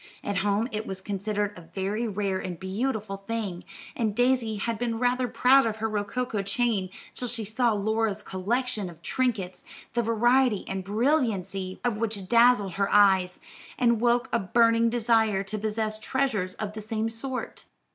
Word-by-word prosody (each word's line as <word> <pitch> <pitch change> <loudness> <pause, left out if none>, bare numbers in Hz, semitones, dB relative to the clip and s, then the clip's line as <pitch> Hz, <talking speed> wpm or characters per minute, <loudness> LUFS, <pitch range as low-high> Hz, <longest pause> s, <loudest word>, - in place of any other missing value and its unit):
At 200 -1 -2
home 205 +3 +1
it 215 0 -4
was 190 -1 -4
considered 205 +1 -2
a 180 - -10
very 205 +4 -1
rare 195 -2 -1
and 180 -3 -5
beautiful 205 +1 -2
thing, 195 -3 -4 0.3
and 220 -4 -1
Daisy 245 -2 +2
had 225 +2 -2
been 235 -2 -1
rather 250 +1 +1
proud 250 +2 +4
of 220 - -2
her 220 0 -2
rococo 215 +1 -2
chain 200 -1 0 0.2
till 250 - -4
she 230 -1 -3
saw 225 +3 +1
Laura's 215 0 0
collection 215 +2 -2
of 170 0 -15
trinkets, 215 -8 -1 0.3
the 240 - +2
variety 235 0 +2
and 190 0 -3
brilliancy 200 - 0
of 240 -4 0
which 210 -4 -2
dazzled 235 -4 +4
her 200 - +2
eyes, 190 -3 +4 0.4
and 235 -2 +2
woke 240 +1 +2
a 235 - +3
burning 230 +3 +3
desire 225 -4 +2
to 210 +2 -4
possess 215 0 -1
treasures 220 -6 -1
of 210 -1 -5
the 215 - -6
same 220 +1 -2
sort. 250 +3 -5
220 Hz, 165 wpm, -27 LUFS, 195-235 Hz, 0.4 s, proud